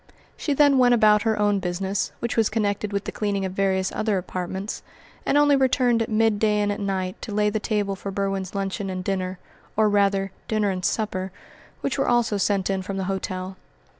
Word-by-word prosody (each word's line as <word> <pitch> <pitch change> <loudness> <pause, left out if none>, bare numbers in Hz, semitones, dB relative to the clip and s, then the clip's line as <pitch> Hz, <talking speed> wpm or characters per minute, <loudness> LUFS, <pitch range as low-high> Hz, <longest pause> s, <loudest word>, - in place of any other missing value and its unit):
She 290 - -1
then 285 -2 +5
went 245 -1 +5
about 210 -2 +5
her 220 0 +1
own 205 -1 +2
business, 190 +2 -2
which 235 - -2
was 225 -2 +3
connected 210 -1 -1
with 200 0 -1
the - - -5
cleaning 200 -2 -1
of 190 - -3
various 190 -1 +1
other 215 -2 0
apartments, 185 +2 -4 0.5
and 285 - +3
only 290 -1 +5
returned 250 -3 +3
at 225 - -1
midday 215 -1 +2
and 205 0 +1
at 205 - -3
night 190 -2 -3
to - - -6
lay 210 0 +2
the 215 - -1
table 205 -2 -1
for 195 +1 -6
Berwin's 195 -1 -2
luncheon 195 0 -2
and 185 -1 -4
dinner, 185 -1 -2 0.4
or 220 0 +4
rather 200 -1 +2 0.2
dinner 215 -2 +1
and 185 -1 -4
supper, 190 -3 -1 0.5
which - - -2
were - - +1
also 240 -3 +2
sent 195 -1 +1
in 195 -1 -1
from 195 +1 -5
the 190 - -1
hotel. 185 0 -4
200 Hz, 200 wpm, -24 LUFS, 190-215 Hz, 0.5 s, then